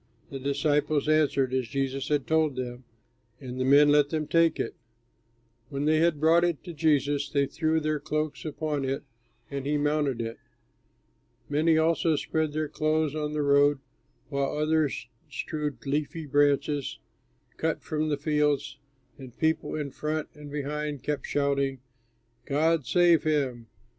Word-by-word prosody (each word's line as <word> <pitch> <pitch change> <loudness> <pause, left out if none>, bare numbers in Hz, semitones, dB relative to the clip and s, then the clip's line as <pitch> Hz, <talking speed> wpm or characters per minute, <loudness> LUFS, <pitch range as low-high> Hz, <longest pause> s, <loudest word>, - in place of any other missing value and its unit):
The 135 - -5
disciples 145 +1 +1
answered 145 -4 +2
as 130 -2 0
Jesus 135 +2 -2
had 145 -2 0
told 160 -3 +2
them, 125 0 -5 0.5
and 130 -2 -7
the - - +1
men 145 +3 +6
let 145 -1 +4
them 155 -1 -1
take 165 +1 +3
it. - - -2 1.0
When 140 0 -3
they 155 +1 +3
had 165 -2 +2
brought 165 +3 +4
it 175 -4 0
to 175 - -7
Jesus, 145 -2 +1
they 140 -1 +2
threw 160 +2 0
their 155 -1 -1
cloaks 155 +1 -3
upon 150 -2 -2
it, 135 +1 -2 0.5
and 140 -1 -3
he 145 +2 0
mounted 145 -3 0
it. 115 0 -4 1.1
Many 155 +2 +3
also 160 0 +2
spread 155 +1 -1
their 155 0 -1
clothes 155 0 0
on 150 -1 -3
the 150 -1 0
road, 145 0 +4 0.5
while 140 0 -1
others 155 -4 +1 0.2
strewed 145 -3 -4
leafy 150 +3 -2
branches 145 0 +1 0.6
cut - - -1
from 155 0 -1
the 145 - 0
fields; 150 -2 0 0.4
and 130 -3 -11
people 160 0 0
in 145 -3 -3
front 155 +2 -3
and 150 -1 -11
behind 150 -1 -4
kept 150 -2 -2
shouting: 140 -2 0 0.7
"God 155 -1 +1
save 175 +2 +5
him! 135 -7 -1
150 Hz, 150 wpm, -27 LUFS, 140-155 Hz, 1.1 s, men